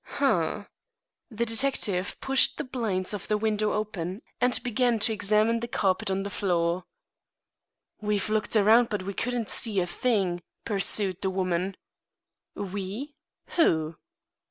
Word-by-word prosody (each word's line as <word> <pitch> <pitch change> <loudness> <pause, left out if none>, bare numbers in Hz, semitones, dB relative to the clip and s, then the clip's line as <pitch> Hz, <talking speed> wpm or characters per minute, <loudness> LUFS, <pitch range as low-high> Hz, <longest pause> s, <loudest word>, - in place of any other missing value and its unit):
"Humph!" - - +1 0.6
The 235 -1 -1
detective 225 -5 0
pushed 270 0 +3
the - - -2
blinds 220 -8 -2
of 205 - -5
the 210 - +2
window 215 0 +1
open 200 -2 -3 0.2
and 250 0 +3
began 245 -1 +2
to 220 +1 +2
examine 215 +2 +2
the 235 - -4
carpet 195 -5 0
on 190 0 0
the 200 - -5
floor. 175 -2 0 1.2
"We've 210 -1 0
looked 215 +1 0
around, 220 +3 +6
but 210 -4 -2
we 200 +1 -4
couldn't 245 +1 -1
see 215 -4 +2
a 180 - +1
thing," 185 -2 0 0.2
pursued 195 -2 +1
the 190 - +1
woman. 185 0 -1 0.8
"We? 205 +8 -5 0.4
Who?" 160 - +3
210 Hz, 135 wpm, -27 LUFS, 185-230 Hz, 1.2 s, around